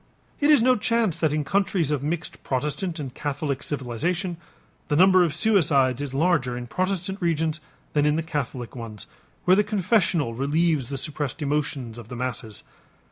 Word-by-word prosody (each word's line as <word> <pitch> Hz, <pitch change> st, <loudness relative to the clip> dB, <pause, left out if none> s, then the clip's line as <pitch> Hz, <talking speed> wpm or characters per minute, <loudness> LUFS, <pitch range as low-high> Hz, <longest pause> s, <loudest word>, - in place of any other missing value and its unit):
It 290 Hz, -, +3 dB
is 295 Hz, -7 st, +6 dB
no 255 Hz, +1 st, +5 dB
chance 225 Hz, -4 st, +1 dB
that 155 Hz, -3 st, +2 dB
in 150 Hz, 0 st, 0 dB
countries 185 Hz, -2 st, +1 dB
of 145 Hz, -3 st, 0 dB
mixed 160 Hz, +4 st, -4 dB
Protestant 150 Hz, +6 st, -2 dB
and 135 Hz, -4 st, -5 dB
Catholic 145 Hz, -2 st, -3 dB
civilization, 165 Hz, -, -2 dB, 0.5 s
the 150 Hz, -, +1 dB
number 185 Hz, +2 st, +6 dB
of 165 Hz, -4 st, -1 dB
suicides 145 Hz, -, +3 dB
is 145 Hz, -2 st, -3 dB
larger 135 Hz, -4 st, +1 dB
in 125 Hz, -, -5 dB
Protestant 185 Hz, -, -2 dB
regions 160 Hz, -2 st, 0 dB, 0.3 s
than 150 Hz, 0 st, +3 dB
in 150 Hz, -, +3 dB
the 165 Hz, -, -1 dB
Catholic 130 Hz, -6 st, -4 dB
ones 115 Hz, -4 st, -7 dB, 0.4 s
where 185 Hz, -, +6 dB
the 210 Hz, -, +4 dB
confessional 190 Hz, -, +1 dB
relieves 145 Hz, +1 st, +1 dB
the 140 Hz, -, -3 dB
suppressed 150 Hz, +1 st, -3 dB
emotions 140 Hz, -5 st, -2 dB
of 115 Hz, -, -10 dB
the 125 Hz, -, -7 dB
masses. 120 Hz, -4 st, -4 dB
150 Hz, 170 wpm, -25 LUFS, 130-180 Hz, 0.5 s, is